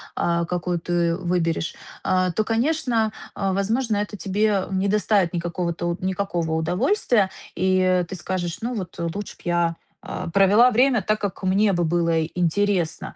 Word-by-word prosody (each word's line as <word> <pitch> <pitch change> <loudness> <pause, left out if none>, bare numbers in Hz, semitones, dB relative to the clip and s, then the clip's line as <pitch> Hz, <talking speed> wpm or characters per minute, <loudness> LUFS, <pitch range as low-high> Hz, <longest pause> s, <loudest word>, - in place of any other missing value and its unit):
о, 170 0 +1
какую 180 0 -2
ты 170 0 0
выберешь. 170 -2 -1 0.3
Э, 185 -1 +2
то, 215 - +2
конечно, 230 -2 0 0.2
о, 195 -1 -1
возможно, 220 +4 0
это 210 0 -3
тебе 200 +1 +1
не 190 +1 0
доставит 205 -3 +2
никакого-то 175 0 -2
никакого 185 -3 -2
удовольствия. 195 - +1 0.3
И 185 0 +2
ты 190 - -5
скажешь: 175 0 -3
"Ну 240 +2 -2
вот 185 -5 -5
лучше 170 +4 -4
б - - -21
я, 175 -1 +1 0.3
а, - - -5
провела 200 +6 +6
время 245 0 +3
так, 215 +3 0
как 200 -2 -4
мне 195 +3 +3
бы 175 -1 +1
было 165 -1 +1
интересно". 175 0 -1
185 Hz, 150 wpm, -23 LUFS, 175-210 Hz, 0.3 s, провела